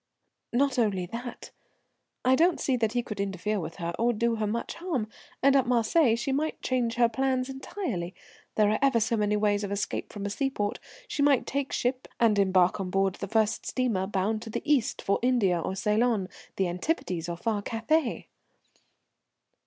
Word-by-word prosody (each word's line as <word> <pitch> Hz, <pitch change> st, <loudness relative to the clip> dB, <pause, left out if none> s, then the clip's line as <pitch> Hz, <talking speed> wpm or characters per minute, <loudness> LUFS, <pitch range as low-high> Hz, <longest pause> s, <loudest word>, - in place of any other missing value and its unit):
"Not 270 Hz, +1 st, +2 dB
only 200 Hz, -6 st, +1 dB
that, 235 Hz, +6 st, -7 dB, 0.7 s
I 255 Hz, -, +5 dB
don't 335 Hz, +5 st, +3 dB
see 265 Hz, -, +1 dB
that 225 Hz, -2 st, 0 dB
he 245 Hz, -1 st, 0 dB
could 215 Hz, -3 st, -7 dB
interfere 200 Hz, +1 st, -1 dB
with 165 Hz, -1 st, -6 dB
her, 170 Hz, 0 st, -4 dB
or 240 Hz, +1 st, +3 dB
do 230 Hz, +1 st, 0 dB
her 215 Hz, -1 st, -1 dB
much 230 Hz, +3 st, -3 dB
harm, 320 Hz, -11 st, -2 dB, 0.4 s
and 275 Hz, 0 st, +5 dB
at 265 Hz, -3 st, +3 dB
Marseilles 240 Hz, +1 st, +3 dB
she 270 Hz, -, -1 dB
might 300 Hz, +4 st, -1 dB
change 245 Hz, -3 st, 0 dB
her 240 Hz, -1 st, +5 dB
plans 260 Hz, +2 st, 0 dB
entirely. 265 Hz, -, -4 dB, 0.4 s
There 210 Hz, -1 st, +4 dB
are 215 Hz, -, +1 dB
ever 270 Hz, -4 st, +4 dB
so 225 Hz, +1 st, +1 dB
many 210 Hz, -1 st, +1 dB
ways 205 Hz, 0 st, +1 dB
of 200 Hz, -, -3 dB
escape 200 Hz, 0 st, -3 dB
from 205 Hz, -1 st, -6 dB
a 200 Hz, -, -2 dB
seaport. 210 Hz, -5 st, -1 dB, 0.3 s
She 290 Hz, -, -2 dB
might 285 Hz, -3 st, +4 dB
take 280 Hz, 0 st, -2 dB
ship 250 Hz, +1 st, -1 dB
and 220 Hz, -3 st, +4 dB
embark 185 Hz, -1 st, +3 dB
on 190 Hz, -1 st, -3 dB
board 195 Hz, 0 st, +1 dB
the 200 Hz, -, -6 dB
first 220 Hz, +1 st, +1 dB
steamer 225 Hz, -8 st, 0 dB
bound 210 Hz, +2 st, -1 dB
to 230 Hz, -, -8 dB
the -, -, -4 dB
East, 290 Hz, -7 st, +1 dB
for 200 Hz, -, +1 dB
India 225 Hz, -8 st, +2 dB
or 190 Hz, -, -3 dB
Ceylon, 210 Hz, -1 st, +1 dB, 0.3 s
the 190 Hz, -, +1 dB
Antipodes 175 Hz, -, -2 dB
or 170 Hz, -, -3 dB
far 210 Hz, +2 st, -1 dB
Cathay." 235 Hz, +6 st, 0 dB
225 Hz, 185 wpm, -28 LUFS, 200-255 Hz, 0.7 s, I